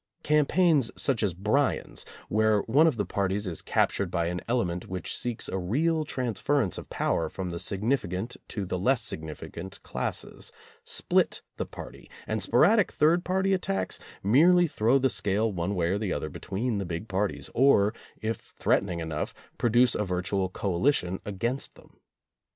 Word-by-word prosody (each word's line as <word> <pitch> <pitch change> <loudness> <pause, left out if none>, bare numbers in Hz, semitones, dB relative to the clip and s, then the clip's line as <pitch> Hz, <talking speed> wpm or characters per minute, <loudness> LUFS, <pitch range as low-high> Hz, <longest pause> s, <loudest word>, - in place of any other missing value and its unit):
Campaigns 150 -2 +3
such 135 -5 +2
as 100 -6 0
Bryan's, 110 +10 0 0.2
where 110 -1 +3
one 145 +11 +4
of 145 -7 +1
the 105 - 0
parties 100 +2 -1
is 85 -4 -4
cap - - +2
tured - - -2
by 85 0 0
an 90 -1 -3
element 90 -8 -1
which 90 0 -4
seeks 120 -2 -3
a 95 - -2
real 155 - +1
transfer 130 +2 0
ence 100 -10 0
of - - -11
power 80 -1 0
from 95 -2 -5
the 85 - -4
significant 105 0 -1
to 100 -3 -4
the 90 0 -3
less 125 +6 +2
sig - - -2
nificant 85 +4 -8
classes, - - -4 0.3
split 460 0 +1
the - - -3
party, - - -10 0.2
and - - -2
sporadic 215 -4 +4
third 165 +4 +3
party 190 +1 +1
attacks 95 - -1 0.2
merely 170 - +6
throw 125 -4 +2
the 135 0 +3
scale 105 -2 +1
one 90 +1 -2
way 85 -2 +1
or 100 +2 0
the 105 -4 -2
other 80 - -3
between 105 - -3
the 100 - -3
big 85 +5 -5
parties, 95 -8 -2
or, 115 -5 +4 0.3
if 110 -1 -4
threaten 100 - +2
ing 85 -1 -3
enough, 80 -2 -3 0.2
produce 120 +1 +4
a - - 0
virtual 95 0 -1
coalition 95 0 0
against 115 +7 -2
them. - - -20
105 Hz, 170 wpm, -28 LUFS, 95-135 Hz, 0.3 s, merely